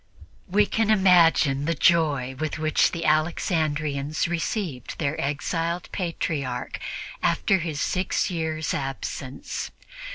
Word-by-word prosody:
We 205 +3 +4
can 220 +1 0
imagine 170 -8 +5
the 170 +2 0
joy 145 -5 +3
with 155 -1 -2
which 155 -1 +2
the 170 -1 -4
Alexandrians 155 -2 0
received 170 - -3
their 150 -1 -1
exiled 165 +4 -2
Patriarch 150 -8 -3 0.4
after 190 +3 +2
his 160 -3 -3
six 185 +3 0
years' 160 -2 -2
absence. 135 0 -4
160 Hz, 105 wpm, -25 LUFS, 145-175 Hz, 0.4 s, imagine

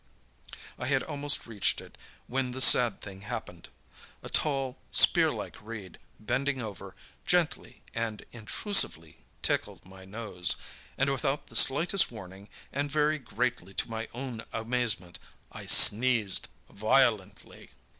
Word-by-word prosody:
I 120 - -4
had 135 -1 +1
almost 145 -1 -1
reached 110 -4 -1
it - - -13 0.3
when 130 0 -2
the 130 - -6
sad 120 -4 +6
thing 95 -1 -10
happened. 105 - -8 0.5
A - - -8
tall, 135 -4 -1
spear - - +5
like - - -7
reed, 105 -4 -9 0.2
bending 130 +5 -1
over, 110 -5 -8 0.3
gently 175 -3 -1
and 115 -2 -4
intrusively 110 - -1 0.3
tickled - - -1
my 95 0 -14
nose, 95 -4 -1 0.4
and 135 +1 +1
without 135 +2 -2
the - - -11
slightest 165 +8 +4
warning, 95 -2 -11 0.2
and 145 +1 -2
very 150 +1 +1
greatly 120 -7 -3
to - - -2
my 115 0 -4
own 120 -2 -6
amazement, 115 -6 -1 0.3
I - - -10
sneezed 115 -3 +5 0.2
violently. 110 -2 0
120 Hz, 125 wpm, -28 LUFS, 105-135 Hz, 0.5 s, sad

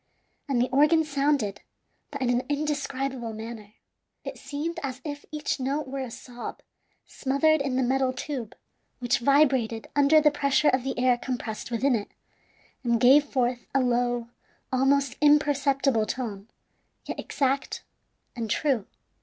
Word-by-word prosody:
And 265 -3 +1
the 245 - +1
organ 300 +4 +4
sounded, 280 -8 0 0.5
but 280 -1 -7
in 245 - +2
an 245 0 +2
indescribable 275 -5 -2
manner. 220 -1 -8 0.5
It - - -7
seemed 295 +5 -4
as 265 -2 -4
if 290 -1 -6
each 300 -1 -2
note 275 +2 -2
were 270 +1 -5
a 260 -2 -4
sob 240 +1 -8 0.4
smothered 280 +3 +1
in 275 -2 -1
the 260 - +2
metal 260 +1 +1
tube, 255 -3 -5 0.4
which 245 -1 0
vibrated 260 -4 +2
under 290 +2 +6
the 300 -1 +4
pressure 280 0 +2
of 255 -1 +1
the 270 - -3
air 250 -1 +3
compressed 240 -5 -4
within 250 +3 +1
it, 210 -3 -2 0.7
and 235 -2 +2
gave 270 +4 +6
forth 250 -3 -1
a - - +5
low, 245 -1 0 0.5
almost 270 0 +2
imperceptible 280 -5 +3
tone, 215 -5 -4 0.6
yet - - -5
exact 275 0 -1 0.5
and 230 -2 -4
true. 260 -8 0
265 Hz, 145 wpm, -26 LUFS, 240-285 Hz, 0.7 s, under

